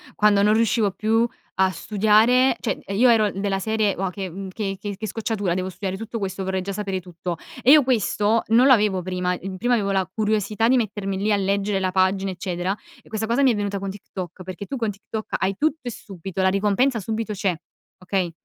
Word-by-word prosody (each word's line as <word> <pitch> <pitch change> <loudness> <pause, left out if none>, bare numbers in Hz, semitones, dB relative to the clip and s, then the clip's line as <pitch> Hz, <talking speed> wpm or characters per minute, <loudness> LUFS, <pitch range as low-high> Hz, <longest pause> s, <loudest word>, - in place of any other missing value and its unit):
quando 210 -1 +4
non 210 - +4
riuscivo 225 -2 +2
più 225 +4 +1 0.3
a 190 0 +3
studiare. 220 +6 +3
Cioè, - - -2
ehm, 195 - -5
io 250 +3 +6
ero 215 -4 +4
della 195 0 -1
serie: 215 0 0
"Uà, 190 -1 -1
che, 190 0 -5
mhmm, 190 +3 -7
che 195 0 -4
che 205 -1 -5
che 215 +2 -4
scocciatura, 205 -3 -2
devo 185 0 -2
studiare 190 0 -4
tutto 225 +2 -5
questo, 195 -1 -3
vorrei 190 0 -1
già 200 +2 -4
sapere 195 -2 -3
tutto." 175 -1 -6 0.3
E 255 - +6
io 300 -1 +8
questo 220 -2 +1
non 235 +4 +5
l'avevo 210 -7 +4
prima. 180 0 -1
El 190 0 -6
prima 245 +5 +1
avevo 205 -4 +1
la 190 -2 +1
curiosità 215 +1 0
di 260 +2 +4
mettermi 205 -4 -2
lì 210 +2 0
a - - +4
leggere 200 +1 0
la 185 -1 0
pagina 190 +1 +2
eccetera 180 +1 -3 0.3
e - - -24
questa 220 0 -2
cosa 235 +5 +1
mi 265 -2 +5
è - - 0
venuta 200 -1 -2
con 195 0 -4
TikTok 185 -2 -8
perché 185 +2 -7
tu 275 - -4
con 225 -3 -1
TikTok 215 +2 -6
hai 190 +1 0
tutto 315 +2 +1
e - - -2
subito, 195 -2 -6
la 190 - +5
ricompensa 210 +6 +2
subito 220 +1 -3
c'è, 190 -2 0 0.4
okay, 185 -1 -1
200 Hz, 220 wpm, -23 LUFS, 190-220 Hz, 0.4 s, io